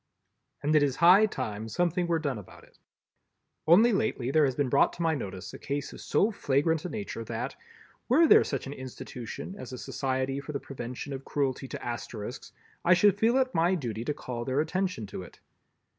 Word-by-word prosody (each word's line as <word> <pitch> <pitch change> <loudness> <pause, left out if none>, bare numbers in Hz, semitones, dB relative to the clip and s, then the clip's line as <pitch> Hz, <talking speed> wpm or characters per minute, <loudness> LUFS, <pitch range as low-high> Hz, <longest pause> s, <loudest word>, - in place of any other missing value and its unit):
And 150 +2 +2
it 150 - +6
is 140 -3 +1
high 185 +6 +7
time 110 - -4
something 175 - 0
were 170 -1 +2
done 140 -8 -2
about 100 - -14
it. - - -22 0.9
Only 215 +8 +6
lately 190 - 0
there 155 0 +5
has 130 -2 0
been 145 -2 +1
brought - - +3
to 170 - -4
my 165 -1 +2
notice 95 -8 -6
a - - -9
case 140 0 -4
of - - -10
so 215 - +2
flagrant 155 -2 +1
a - - -2
nature 200 - -5
that, 120 +4 -4 0.5
were 305 +7 +6
there - - +7
such 135 - -3
an 140 - -5
institution 130 +4 -7
as - - -8
a - - -5
Society 135 +1 -2
for 150 +2 -7
the 140 - -2
Prevention 125 +1 -6
of 135 0 -6
Cruelty 135 -2 -1
to - - -7
Asterisks, 120 0 -6 0.3
I 180 +1 +6
should 200 +2 +4
feel 230 +4 +4
it 260 -1 +1
my 170 +3 +3
duty 115 - -4
to 150 - 0
call 120 -4 -5
their 130 +3 0
attention 180 - -1
to 100 -1 -7
it. 90 - -13
140 Hz, 205 wpm, -28 LUFS, 125-175 Hz, 0.9 s, high